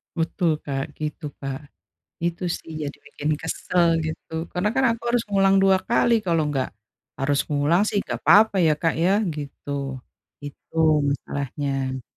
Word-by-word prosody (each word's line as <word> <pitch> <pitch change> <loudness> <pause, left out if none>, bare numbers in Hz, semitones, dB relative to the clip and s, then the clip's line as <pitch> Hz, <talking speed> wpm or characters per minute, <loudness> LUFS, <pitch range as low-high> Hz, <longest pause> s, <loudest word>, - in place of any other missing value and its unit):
Betul, 165 +1 0
Kak, 135 -1 -4
gitu, 150 +1 -4 0.2
Kak. 135 -1 -4 0.6
Itu 170 +1 -2
sih 160 - -13
jadi 145 - -6
bikin 150 +2 -3
kesel 170 +2 0 0.2
gitu, 160 +1 -5
karena 180 +4 +1
kan 265 0 +3
aku 230 - -9
harus 240 -1 +2
ngulang 195 -1 +3
2 195 0 +5
kali, 235 0 +4
kalau 165 -3 +2
enggak 135 -3 -1 0.5
harus 140 +1 +2
ngulang 150 +5 +3
sih - - -1
nggak - - -5
papa 215 0 +6
ya, 155 - +5
Kak, 165 -1 +2
ya, 180 - +4 0.2
gitu. 145 -1 -8 0.8
Itu 145 +3 -11 0.3
masalahnya. 135 -1 -3
160 Hz, 150 wpm, -24 LUFS, 145-190 Hz, 0.8 s, papa